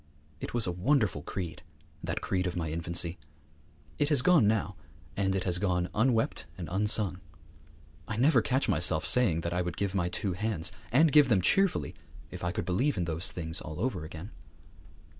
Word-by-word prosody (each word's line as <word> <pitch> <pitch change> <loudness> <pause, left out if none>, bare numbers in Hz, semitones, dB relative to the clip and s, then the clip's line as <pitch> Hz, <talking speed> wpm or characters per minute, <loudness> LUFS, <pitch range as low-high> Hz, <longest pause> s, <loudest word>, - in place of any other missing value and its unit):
It - - -6
was 120 - +3
a 90 - -1
wonderful 100 - +1
creed, 85 +1 -6 0.4
that - - -3
creed 90 -1 -1
of 90 - -4
my 80 -3 -3
infancy. 85 +1 -2 0.8
It 145 -1 +2
has 145 -5 +3
gone 175 - +5
now, 105 -2 0 0.4
and 95 -1 0
it 95 - -1
has 90 -2 0
gone 90 -2 0
unwept 115 -8 +1
and 90 -3 -6
unsung. 100 -1 +2 0.9
I 105 - -4
never 140 +7 +4
catch 130 +1 0
myself 80 -1 +2
saying 105 -10 +4
that 85 +1 -3
I 90 - 0
would 90 -1 -4
give 100 -2 -2
my 90 -3 0
two 95 +1 -2
hands, 95 -3 -1 0.2
and 150 +5 +4
give 150 -2 +6
them 105 -5 +4
cheerfully, 195 - +1 0.4
if - - -8
I 90 - -1
could - - -4
believe 120 +9 0
in 90 - -1
those 85 +2 -1
things 80 0 -3
all 75 0 -8
over 125 -9 -2
again. 80 +6 -9
95 Hz, 185 wpm, -29 LUFS, 85-115 Hz, 0.9 s, give